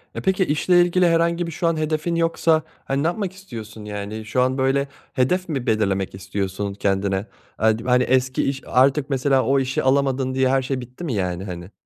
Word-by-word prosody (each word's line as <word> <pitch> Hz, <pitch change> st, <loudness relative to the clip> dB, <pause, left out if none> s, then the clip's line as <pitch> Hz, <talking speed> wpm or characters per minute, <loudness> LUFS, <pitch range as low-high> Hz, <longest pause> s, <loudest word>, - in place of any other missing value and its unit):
E, -, -, -4 dB
peki, 190 Hz, 0 st, +2 dB
işle 175 Hz, +4 st, +3 dB
ilgili 175 Hz, +1 st, +3 dB
herhangi 170 Hz, +1 st, +2 dB
bir -, -, -5 dB
şu 170 Hz, +2 st, -1 dB
an 165 Hz, -1 st, +1 dB
hedefin 155 Hz, +2 st, -1 dB
yoksa, 165 Hz, -1 st, +2 dB, 0.2 s
hani, 135 Hz, +1 st, -1 dB
ne -, -, +2 dB
yapmak 190 Hz, +1 st, -2 dB
istiyorsun? 115 Hz, -, -9 dB
Yani, 105 Hz, +1 st, -5 dB
şu 110 Hz, +4 st, 0 dB
an 130 Hz, +1 st, +1 dB
böyle 135 Hz, +1 st, +1 dB, 0.3 s
hedef 180 Hz, +9 st, +1 dB
mi 135 Hz, -6 st, -2 dB
belirlemek 100 Hz, -4 st, 0 dB
istiyorsun 95 Hz, +1 st, -3 dB
kendine? 95 Hz, 0 st, -1 dB, 0.3 s
Ad 110 Hz, 0 st, +2 dB
hani 125 Hz, 0 st, +4 dB
eski 130 Hz, +1 st, +1 dB
iş, 135 Hz, 0 st, -2 dB
artık 135 Hz, +2 st, +3 dB
mesela 135 Hz, -1 st, +2 dB
o 135 Hz, +1 st, +2 dB
işi 130 Hz, 0 st, -1 dB
alamadın 135 Hz, -1 st, +1 dB
diye 130 Hz, 0 st, +2 dB
her 135 Hz, 0 st, +3 dB
şey 130 Hz, 0 st, -3 dB
bitti 125 Hz, +7 st, -10 dB
mi 150 Hz, -7 st, -2 dB
yani, 90 Hz, -3 st, -2 dB
hani? 90 Hz, 0 st, -7 dB
130 Hz, 195 wpm, -22 LUFS, 110-155 Hz, 0.3 s, hani